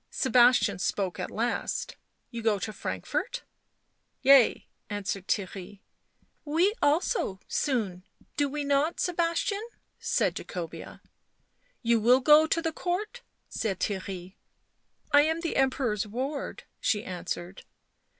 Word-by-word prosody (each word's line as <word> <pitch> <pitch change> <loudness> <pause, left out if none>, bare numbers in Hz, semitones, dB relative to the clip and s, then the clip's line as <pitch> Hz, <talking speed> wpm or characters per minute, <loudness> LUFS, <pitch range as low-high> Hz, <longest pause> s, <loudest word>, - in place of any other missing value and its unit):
Sebastian 245 -5 +4
spoke 185 -1 -1
at - - -3
last. 235 +2 -2 0.4
"You 235 -2 -5
go 220 -2 +2
to 215 +3 -4
Frankfort?" - - -3 0.4
" - - -48
Yea," 270 -3 +6 0.2
answered 200 -2 -4
Theirry. 195 0 -3 0.3
" - - -41
We 380 +5 +4
also, 290 - +1
soon, 210 -10 -1 0.3
do 285 -1 +1
we 295 +1 -3
not, 285 +3 +1
Sebastian 345 +3 0 0.3
?" - - -48
said - - +1
Jacobea. 170 -3 -7 0.4
" - - -42
You 235 -1 +3
will 245 +4 +5
go 300 +3 +6
to 330 +1 0
the 325 - 0
court," 420 +9 -3 0.3
said 195 -4 -3
Theirry. 190 -2 -4 0.4
" - - -47 0.3
I 290 - +7
am 320 +2 0
the 335 - -2
Emperor's 255 -6 +1
ward," 275 - -4 0.2
she 210 0 0
answered. 180 0 -5
245 Hz, 130 wpm, -28 LUFS, 200-310 Hz, 0.4 s, I